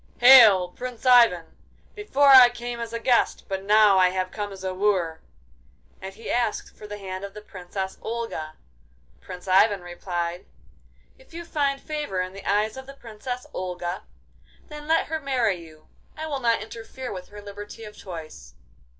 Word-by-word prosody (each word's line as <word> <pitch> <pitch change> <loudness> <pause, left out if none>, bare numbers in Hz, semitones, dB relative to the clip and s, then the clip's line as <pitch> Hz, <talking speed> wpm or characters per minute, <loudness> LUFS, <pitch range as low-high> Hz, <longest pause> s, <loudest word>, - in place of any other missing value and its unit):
'Hail, 225 -8 +8
Prince 250 +5 -8
Ivan! 235 -9 +4 0.4
Before 285 -10 +2
I 260 -2 +10
came 240 0 -6
as 230 -1 -5
a 230 - -3
guest, 240 +1 +1
but 195 -1 -3
now 210 -1 +5
I 185 -1 +5
have 185 0 -3
come 205 -1 -5
as 190 -1 -10
a 185 0 -3
wooer!' 185 -5 0 0.8
And 190 +1 -7
he 225 - -11
asked 235 -3 -2
for 210 - -11
the 205 0 -7
hand 190 -1 -7
of 200 0 -8
the 210 - -8
Princess 190 0 -7
Olga. 225 -9 -5 0.7
Prince 180 0 -10
Ivan 195 +1 +4
replied: 175 0 -5 0.7
'If - - -18
you 340 0 -7
find 285 -4 -1
favour 300 - -4
in 185 0 -3
the 195 0 -7
eyes 215 +3 0
of 265 0 -9
the 275 - -11
Princess 245 +1 -7
Olga, 180 0 -4 0.7
then 300 -1 -9
let 325 +1 +2
her 320 0 -3
marry 255 -9 0
you. 155 -1 -17 0.3
I 315 - -5
will 290 -3 -3
not 230 -4 +1
interfere 230 +3 -8
with 180 -1 -8
her 205 - -12
liberty 205 +2 -10
of 210 -1 -10
choice. 155 - -10
210 Hz, 175 wpm, -24 LUFS, 185-245 Hz, 0.8 s, I